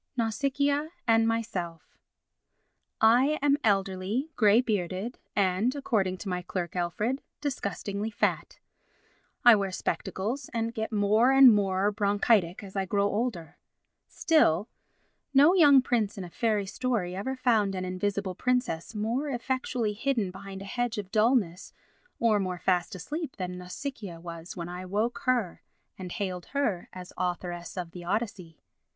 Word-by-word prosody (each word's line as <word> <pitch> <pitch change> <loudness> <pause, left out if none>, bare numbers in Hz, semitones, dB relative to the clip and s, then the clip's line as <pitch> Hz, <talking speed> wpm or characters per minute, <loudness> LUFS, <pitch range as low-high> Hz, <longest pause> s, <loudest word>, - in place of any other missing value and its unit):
Nausicaa 280 +6 0 0.2
and 225 0 +4
Myself 205 -8 -3 1.0
I 250 +7 +4
am 285 0 +3
elderly, 200 +6 0
grey 215 0 +5
bearded 205 -1 -2 0.2
and, 200 +6 +1
according 205 -9 0
to 205 - -8
my 180 -1 -2
clerk, 175 0 -4
Alfred, 210 +10 -1 0.2
disgustingly 205 -6 -3
fat; 215 +1 -1 0.9
I 240 -2 +10
wear 200 -2 -1
spectacles 215 +7 -3
and 230 0 -1
get 220 -1 -3
more 215 +4 +3
and 270 -3 +8
more 195 0 +1
bronchitic 205 -3 +1
as 195 -1 -11
I 195 -1 0
grow 200 +1 +1
older. 205 -8 -3 0.5
Still 220 - +2 0.7
no 290 +6 +7
young 290 -8 +7
prince 225 -6 0
in 195 - -4
a 175 - -9
fairy 215 -2 0
story 210 -4 -2
ever 260 +8 -3
found 225 -6 +2
an 185 0 -3
invisible 190 +1 -2
princess 245 -4 -1
more 235 +8 -1
effectually 250 -3 -2
hidden 225 -3 -1
behind 195 0 -9
a - - -9
hedge 245 +3 -2
of 200 -2 -5
dullness 215 -5 +1 0.5
or 220 -3 +3
more 185 -2 -2
fast 180 +2 0
asleep 295 - -5
than 180 -2 -4
Nausicaa 185 -1 -6
was 170 +1 -8
when 170 -1 -4
I 180 +1 -6
woke 210 +6 -1
her 240 -9 0 0.3
and 185 -2 -8
hailed 185 -3 -4
her 235 -11 -1
as 180 -1 -10
Authoress 175 -1 -3
of 175 -2 -4
the 175 0 -9
Odyssey. 190 -4 -4
205 Hz, 145 wpm, -28 LUFS, 185-240 Hz, 1.0 s, I